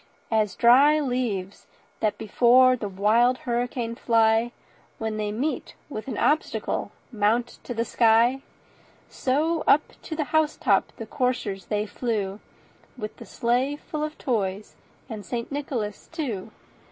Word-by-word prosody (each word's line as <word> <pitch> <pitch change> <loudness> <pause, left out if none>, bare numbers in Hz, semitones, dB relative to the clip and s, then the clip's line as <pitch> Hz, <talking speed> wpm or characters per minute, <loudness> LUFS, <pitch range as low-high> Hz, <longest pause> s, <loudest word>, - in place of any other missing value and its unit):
As 215 -3 +1
dry 275 +6 +6
leaves 240 -9 -3 0.3
that 215 - 0
before 250 +4 +5
the 215 -4 -5
wild 220 +6 +3
hurricane 240 -1 -2
fly, 225 0 +2 0.5
When 220 -1 -3
they 210 -1 -2
meet 265 +9 -3
with 220 -5 -6
an 265 - -4
obstacle, 310 +1 0 0.2
mount 225 +2 0
to 245 - -5
the 230 +1 0
sky, 235 +3 +3 0.7
So 310 +5 0
up 300 - +6 0.2
to 315 - -6
the 310 - 0
house 315 -1 +2
top 200 -5 +2
the 225 - -6
coursers 220 -6 -2
they 210 0 -1
flew, 210 -3 -3 0.6
With 215 -3 -6
the - - -11
sleigh 250 +4 0
full 300 +1 -5
of 305 0 -4
toys, 205 -5 -2 0.3
and 220 -4 -7
St. 235 +6 -4
Nicholas 255 -7 -4
too. 235 - -4
235 Hz, 140 wpm, -25 LUFS, 215-260 Hz, 0.7 s, dry